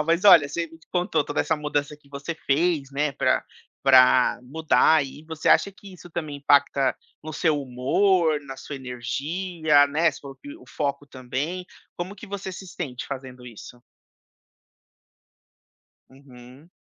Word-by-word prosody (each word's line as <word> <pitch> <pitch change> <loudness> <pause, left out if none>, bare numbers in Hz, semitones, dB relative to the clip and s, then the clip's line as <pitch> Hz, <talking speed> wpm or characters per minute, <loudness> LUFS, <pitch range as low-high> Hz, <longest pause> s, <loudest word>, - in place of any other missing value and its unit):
Legal, - - 0
mas 170 +4 +1
olha, 170 -8 +8
você 170 +4 -3
me 165 0 -16
contou 180 -4 0
toda 145 - -2
essa 160 - 0
mudança 150 -1 -2
que 145 -1 -26
você 140 +4 -6
fez, 150 -1 0
né, 145 +1 -1
pra - - +1 0.4
pra 130 -2 +5
mudar, 155 +2 +3
e 145 +3 -12
você 160 0 -3
acha 200 - +4
que 195 0 -14
isso 175 0 -14
também 155 -3 -5
impacta 140 -1 +2 0.3
no 155 - -7
seu 150 -2 0
humor, 155 +6 +1
na 135 -2 -9
sua 145 - -8
energia, 145 +5 0
né, 155 +4 +2
sob 140 -2 -11 0.2
o - - -17
foco 140 -1 -3
também. 140 +7 -4 0.3
Como 180 +3 -5
que 210 - -11
você 195 -1 -6
se 190 +1 -9
sente 135 -8 -6
fazendo 130 -2 -8
isso? 120 +1 -12 2.3
Uhum. 130 +2 -16
145 Hz, 150 wpm, -24 LUFS, 135-170 Hz, 2.3 s, olha